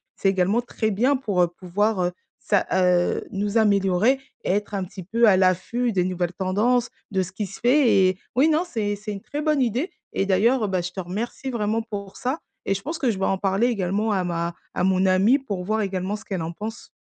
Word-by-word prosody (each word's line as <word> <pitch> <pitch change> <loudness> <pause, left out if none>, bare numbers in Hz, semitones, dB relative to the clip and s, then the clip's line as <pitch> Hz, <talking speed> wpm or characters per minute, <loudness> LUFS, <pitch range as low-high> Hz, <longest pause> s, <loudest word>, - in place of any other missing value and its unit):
c'est 195 - +1
également 195 +4 +2
très 230 -2 -2
bien 245 +8 +2
pour, 205 -8 0
heu, - - +3
pouvoir, 185 +4 -1
heu, 175 - 0 0.3
s'a 200 - +1
heu, 180 -1 +2
nous 205 +2 -1
améliorer 200 +4 +3 0.2
et - - -3
être 205 +2 -1
un 195 -1 -1
petit 185 +1 -9
peu 230 +6 +3
à 195 -3 +6
l'affût 190 +7 +1
des 185 -4 +1
nouvelles 180 -1 -2
tendances, 215 +7 +1 0.2
de 190 -2 +1
ce 185 0 -4
qui 210 +2 -3
se 195 - -10
fait, 250 +1 +4
et 185 - -3 0.2
oui, 270 +5 +5
non 315 +2 +2
c'est 210 -9 -2
c'est 210 +1 -7
une 200 -1 -6
très 290 +7 -5
bonne 305 -2 +2
idée 250 - 0 0.2
et 195 - 0
d'ailleurs, 220 +6 +3
heu, - - -1
bah, 185 -2 0
je 180 +1 -5
te 190 - -7
remercie 210 +9 -4
vraiment 220 -1 0
pour 200 -3 -7
ça 260 +5 -2 0.3
et 195 - +1
je 195 - -4
pense 315 +7 -4
que 260 -6 +2
je 205 - -4
vais 195 - +1
en 195 - +1
parler 195 +4 +1
également 205 -1 0
à 190 -3 +1
ma 170 -1 -2 0.2
à - - -1
mon 190 0 +3
amie 190 +7 +4
pour 200 -9 -4
voir 215 +4 0
également 190 0 -2
ce 215 - -10
qu'elle 190 -4 -3
en 165 - -4
pense. 215 +5 -7
200 Hz, 235 wpm, -24 LUFS, 185-230 Hz, 0.3 s, à